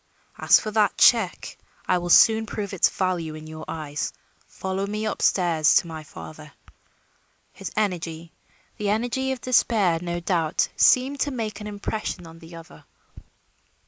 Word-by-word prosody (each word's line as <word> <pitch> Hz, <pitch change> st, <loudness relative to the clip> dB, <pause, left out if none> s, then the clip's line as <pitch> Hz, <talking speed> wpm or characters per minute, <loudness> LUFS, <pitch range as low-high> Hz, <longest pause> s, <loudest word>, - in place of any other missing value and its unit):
As -, -, +6 dB
for 215 Hz, -, -5 dB
that 210 Hz, -2 st, +1 dB
check, 225 Hz, -7 st, +3 dB, 0.3 s
I 180 Hz, -, +2 dB
will 175 Hz, 0 st, -5 dB
soon 220 Hz, +4 st, +6 dB
prove 205 Hz, -2 st, -5 dB
its 190 Hz, -, +3 dB
value 175 Hz, -4 st, -2 dB
in 155 Hz, 0 st, -10 dB
your 155 Hz, 0 st, -9 dB
eyes. 155 Hz, -2 st, -4 dB, 0.4 s
Follow 190 Hz, +1 st, -4 dB
me 210 Hz, +1 st, -3 dB
up 215 Hz, -, -3 dB
stairs 165 Hz, -5 st, +3 dB
to -, -, +4 dB
my 160 Hz, -1 st, -7 dB
father." 80 Hz, -, -11 dB, 1.0 s
His -, -, -7 dB
energy 170 Hz, -5 st, -2 dB, 0.5 s
the 205 Hz, -1 st, -2 dB
energy 245 Hz, +5 st, -1 dB
of 260 Hz, -3 st, -4 dB
despair, 220 Hz, -8 st, +2 dB
no 175 Hz, -1 st, -3 dB
doubt 170 Hz, -2 st, 0 dB
seemed 265 Hz, +2 st, +3 dB
to 290 Hz, -, 0 dB
make 220 Hz, -5 st, -5 dB
an 210 Hz, -, -6 dB
impression 205 Hz, -3 st, -5 dB
on 165 Hz, 0 st, -13 dB
the 165 Hz, 0 st, -13 dB
other. 165 Hz, -, -14 dB
185 Hz, 155 wpm, -24 LUFS, 165-215 Hz, 1.0 s, As